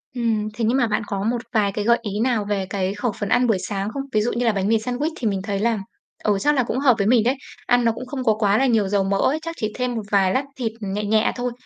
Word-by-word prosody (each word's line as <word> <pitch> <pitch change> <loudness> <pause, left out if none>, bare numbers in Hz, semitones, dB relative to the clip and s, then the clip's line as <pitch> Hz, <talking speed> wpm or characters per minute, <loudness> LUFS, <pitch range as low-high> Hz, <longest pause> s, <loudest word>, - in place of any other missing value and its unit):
Ừm, 225 -3 0
thế 230 0 -2
nhưng 240 +4 +2
mà 245 -4 +2
bạn 215 +1 -1
có 195 0 -2
một 235 +1 0
vài 205 -3 +2
cái 205 +1 -3
gợi 235 0 +5
ý 210 -2 -4
nào 230 -3 +1
về 200 -2 -1
cái 190 -1 -1
khẩu 210 +3 -2
phần 205 - -2
ăn 250 0 +3
buổi 220 -4 +3
sáng 200 +2 -3
không? 275 - -3
Ví 215 - +3
dụ 235 - 0
như 245 +1 -1
là 230 - +4
bánh 195 -2 -1
mì 225 +1 +4
sandwich 250 +7 -2
thì 235 - -1
mình 195 -2 -1
thấy 200 0 -2
là, 230 +1 +1 0.5
ừ, 210 -2 +2
chắc 295 +8 +2
là 255 - +3
cũng 245 - -2
hợp 265 -4 +4
với 200 - +1
mình 235 -1 +4
đấy. 250 +4 +2 0.3
Ăn 245 -1 +3
nó 230 - +4
cũng 240 +3 -7
không 260 0 -5
có 225 -3 +4
quá 205 -1 +3
là 270 - +3
nhiều 225 -6 +2
dầu 200 0 +1
mỡ 195 +1 0
ấy, 290 +9 +1
chắc 330 +1 -6
chỉ 215 -1 -2
thêm 250 -1 -2
một 225 - -2
vài 195 -2 +3
lát 265 - +1
thịt 240 -4 -2
nhẹ 205 0 -3
nhẹ 215 +1 +2
thôi, 245 0 -2
220 Hz, 310 wpm, -22 LUFS, 205-245 Hz, 0.5 s, gợi